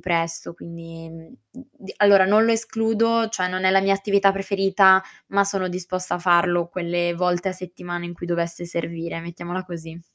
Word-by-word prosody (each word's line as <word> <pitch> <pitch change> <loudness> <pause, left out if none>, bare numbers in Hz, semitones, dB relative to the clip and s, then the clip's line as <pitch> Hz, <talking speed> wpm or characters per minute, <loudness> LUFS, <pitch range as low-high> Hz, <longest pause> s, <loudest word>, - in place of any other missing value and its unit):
presto, 165 -1 -2
quindi 165 -1 -11
uhm, 165 +5 -14 0.2
d 255 -7 -13
allora, 200 -2 +6
non 210 +3 +4
lo 230 - +3
escludo, 225 0 +1
cioè, 185 -5 -1
non 185 +1 -3
è 185 - +4
la 195 - +4
mia 195 0 +2
attività 200 0 +2
preferita, 195 -1 +4 0.3
ma 200 0 +2
sono 195 -2 -2
disposta 185 0 -4
a - - -3
farlo 175 -1 +2
quelle 175 -1 -2
volte 180 +1 0
a - - -5
settimana 175 -1 -7
in 175 0 -7
cui 175 - -8
dovesse 170 0 -3
servire, 170 -1 -5
mettiamola 175 +2 -6
così. 165 -2 -9
180 Hz, 175 wpm, -22 LUFS, 170-195 Hz, 0.3 s, allora